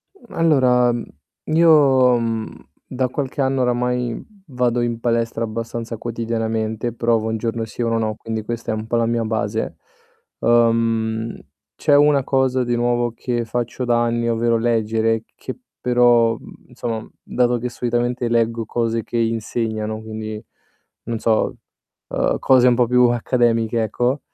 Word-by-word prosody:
Mhmm, 240 - -17
allora, 130 -7 +4
mhmm, 120 0 -3 0.5
io, 140 -7 +5
mhmm, 115 -1 -2 0.4
da 130 0 -1
qualche 140 +1 -3
anno 135 0 +1
oramai 125 -1 0 0.3
vado 125 -1 +1
in 120 -1 -2
palestra 115 -1 0
abbastanza 115 +1 -4
quotidianamente, 115 0 -2
provo 115 -1 +1
1 110 - -1
giorno 115 0 -2
sì 115 - -7
e - - +2
1 115 -1 +1
no, 110 -1 -1
quindi 110 0 -5
questa 115 +1 -4
è - - -1
un 110 0 -5
po' 120 - -1
la 115 - +2
mia 115 0 0
base. 110 0 -2 0.6
Uhm, 115 -1 +1 0.4
c'è 145 -2 +3
una 145 -1 +4
cosa 130 -1 +1
di 120 0 -1
nuovo 120 0 0
che 120 -2 -2
faccio 120 +2 -3
da 120 0 +2
anni, 120 0 0
ovvero 115 0 +1
leggere, 115 -1 +1
che - - -7 0.2
però, 120 -2 +4
mhmm, - - -15
insomma 115 -2 -4 0.2
dato 125 -1 +1
che 125 +1 -3
solitamente 120 0 -1
leggo 115 -1 0
cose 115 0 -1
che 120 - -4
insegnano, 110 -1 -2
quindi, 110 0 -6 0.6
non 115 -1 -4
so, 110 -1 +1 0.5
uhm, - - 0
cose 130 -1 +5
un 125 - +5
po' 120 -1 +2
più 125 +1 +5
accademiche 115 -1 +1
ecco 125 +5 0
115 Hz, 155 wpm, -20 LUFS, 115-125 Hz, 0.6 s, io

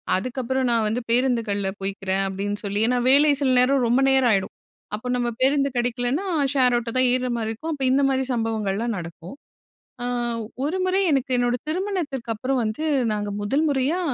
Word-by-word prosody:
அதுக்கப்புறம் 255 +4 -1
நான் 230 -2 +2
வந்து 225 +4 -1
பேருந்துகள்ல 230 -6 +1
போய்க்கிறேன் 195 0 -1
அப்பிடின்னு 200 +2 -3
சொல்லி 200 +1 -2
ஏன்னா 250 0 +1
வேலை 290 +2 +6
சில 265 - +2
நேரம் 255 0 +3
ரொம்ப 245 +3 +3
நேரம் 265 -2 +4
ஆயிடும். 195 -2 0 0.4
அப்போ 225 +4 -7
நம்ம 245 -1 0
பேருந்து 275 +1 +3
கிடைக்கலன்னா 245 +7 -1 0.3
ஷேர் 250 -3 +3
ஆட்டோ 230 -1 -3
தான் 255 - +4
ஏர்ற 255 0 0
மாரி 220 -1 -2
இருக்கும். 310 +9 -5
அப்போ 270 -2 -2
இந்தமாரி 270 -1 +2
சம்பவங்கள்லாம் 225 -1 -1
நடக்கும். 170 +5 -8 0.7
ஆ - - -2 0.6
1 325 +6 -1
முறை 375 +1 +2
எனக்கு 265 -2 0
என்னோட 245 0 +1
திருமணத்திற்கு 320 - -3
அப்புறம் 260 +3 -1
வந்து 220 +7 -3 0.3
நாங்க 205 -1 -3
1 275 +9 +1
முறையா 280 +6 0
245 Hz, 165 wpm, -23 LUFS, 215-270 Hz, 0.7 s, வேலை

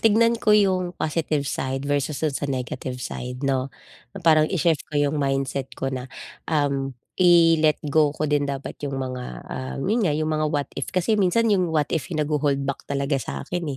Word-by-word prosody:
tignan 230 +1 +4
ko 210 -1 +5
yung 185 -3 +1
positive 155 -2 -1
side 135 -1 -3
versus 145 +1 0
dun 155 -3 +1
sa 145 +1 -3
negative 130 -1 -3
side 125 +1 -5
'no, 135 -1 0 0.5
na - - -4
parang 155 -2 +5
i-shift 170 -4 +1
ko 155 - -11
yung 145 +1 +2
mindset 135 -1 -1
ko 135 0 -2
na, 130 0 -5 0.4
um, 140 -4 0 0.2
i-let 165 -3 +5 0.2
go 155 -1 +5
ko 155 - -3
din 145 0 +2
dapat 140 -1 -4 0.2
yung 135 - -4
mga, 130 -1 -4 0.2
ah, 130 0 -5
yun 215 - +1
nga, 170 -7 +2
yung 155 0 -1
mga 155 0 +1
what 145 -3 -1
if. 140 - -4
Kasi 185 +4 +1
minsan, 195 +5 +3
yung 185 -3 +2
what 155 -2 +1
if 150 -5 -2
yung 160 - -2
nagho-hold 145 -2 +1
back 140 - -2
talaga 140 +1 0
sa'kin, 175 +6 -4
150 Hz, 190 wpm, -24 LUFS, 135-165 Hz, 0.5 s, ko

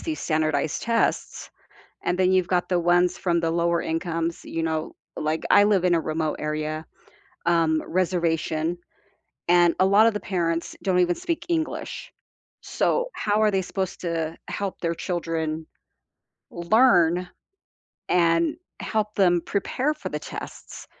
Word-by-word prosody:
these 320 -2 -4
standardized 155 -2 0
tests, 230 0 -1 0.6
and 180 +1 -1
then 185 0 +4
you've 185 -2 +2
got 180 -1 0
the 180 -1 +2
ones 175 +1 +3
from 170 -2 +1
the 165 -1 0
lower 170 0 +1
incomes, 165 0 -2
you 165 - -3
know 160 -1 -2 0.2
like, 155 +1 -1
I 205 0 +7
live 200 -3 +3
in 180 -1 +3
a - - +2
remote 155 0 -2
area, 155 +1 -3 0.6
um, 165 -2 +2
reservation, 170 -2 0 0.7
and 175 -1 +5
a - - +6
lot 205 +3 +6
of 230 - +2
the 210 - -2
parents 170 -3 -2
don't 185 -2 +1
even 175 -1 +3
speak 335 - -3
English, 340 +9 -3 0.5
so, - - 0
how 210 0 0
are 215 -1 +4
they 190 -1 +1
supposed 190 0 -4
to 165 -2 -2
help 200 -2 -4
their 170 -1 -1
children 160 -3 -3 0.8
learn 175 -2 +3 0.8
and 170 - +2 0.2
help 215 -1 -2
them 175 -3 +3
prepare 255 +8 -1
for - - -6
the - - -3
tests, - - -9
175 Hz, 145 wpm, -24 LUFS, 165-190 Hz, 0.8 s, I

